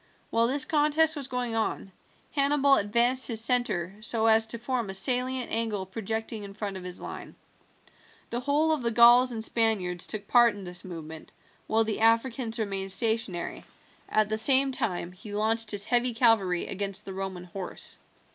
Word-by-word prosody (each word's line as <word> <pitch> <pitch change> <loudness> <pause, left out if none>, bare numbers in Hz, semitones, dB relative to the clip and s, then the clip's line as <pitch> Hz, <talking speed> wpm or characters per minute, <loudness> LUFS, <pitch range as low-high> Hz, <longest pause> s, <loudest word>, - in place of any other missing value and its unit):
While 230 0 +2
this 275 +2 +2
contest 310 +1 +2
was 280 -3 -5
going 250 -3 -3
on, 220 -3 -3 0.4
Hannibal 280 -1 +2
advanced 240 +4 +3
his 225 -3 0
centre 230 -7 +2
so 225 0 0
as 225 0 +4
to 235 - -3
form 240 -2 -3
a 195 - -1
salient 255 +3 +2
angle 220 -4 -2
projecting 220 +2 -5
in 200 -1 -10
front 205 -2 -5
of 185 - -8
his 180 0 -6
line. - - -9 1.0
The 235 - -2
whole 290 +5 0
of 310 -3 -1
the 235 - -1
Gauls 240 +2 +5
and 225 -2 +1
Spaniards 200 -7 0
took 210 -2 -3
part 240 -3 +4
in 200 - -10
this 180 -1 -5
movement, 160 -3 -10 0.4
while 225 +1 +2
the 220 -1 -3
Africans 230 +1 0
remained 195 -3 -3
stationary; 220 -5 -1 0.5
at 215 -1 +1
the 215 +1 -1
same 270 +4 +6
time 190 -9 -3
he 205 +3 -10
launched 220 +1 0
his 205 -1 +3
heavy 245 -1 0
cavalry 220 -7 +2
against 195 0 -3
the 195 - -7
Roman 190 -2 -6
horse. 180 +1 -6
225 Hz, 175 wpm, -26 LUFS, 195-245 Hz, 1.0 s, same